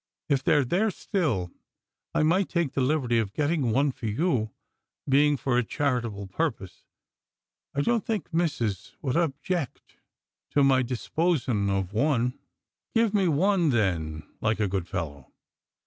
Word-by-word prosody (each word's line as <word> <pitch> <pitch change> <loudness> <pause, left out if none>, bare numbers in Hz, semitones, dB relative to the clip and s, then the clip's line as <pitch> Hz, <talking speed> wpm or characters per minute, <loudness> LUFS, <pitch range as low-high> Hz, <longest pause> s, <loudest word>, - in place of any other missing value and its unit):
If 135 -2 +2
they're 145 -2 +3
there 195 - +2
still, 150 - -1 0.6
I - - +3
might 180 +5 +2
take 170 -6 0
the 140 - -1
liberty 125 -4 +2
of 105 -3 -2
gettin' 150 -4 +1
one 135 +5 +2
for 120 - -6
yon; 115 - 0 0.6
bein' 145 +1 +4
for 125 0 +1
a - - +1
charitable 120 -6 -1
purpose, 100 - -3 0.9
I 140 - +2
don't 230 +7 +1
think 215 -6 -3
missus 135 - -1
would 130 -1 -1
objeck 165 -1 -1 0.8
to 145 - +5
my 135 -1 +5
disposin' 125 - 0
of 95 -1 -1
one." 125 0 +2 0.3
" - - -51
Get 225 -2 +3
me 195 -3 +3
one, 175 +2 +3
then, 85 - 0 0.2
like 110 0 +1
a 105 - +2
good 95 -2 -2
fellow." 70 -7 -5
135 Hz, 150 wpm, -27 LUFS, 110-160 Hz, 0.9 s, to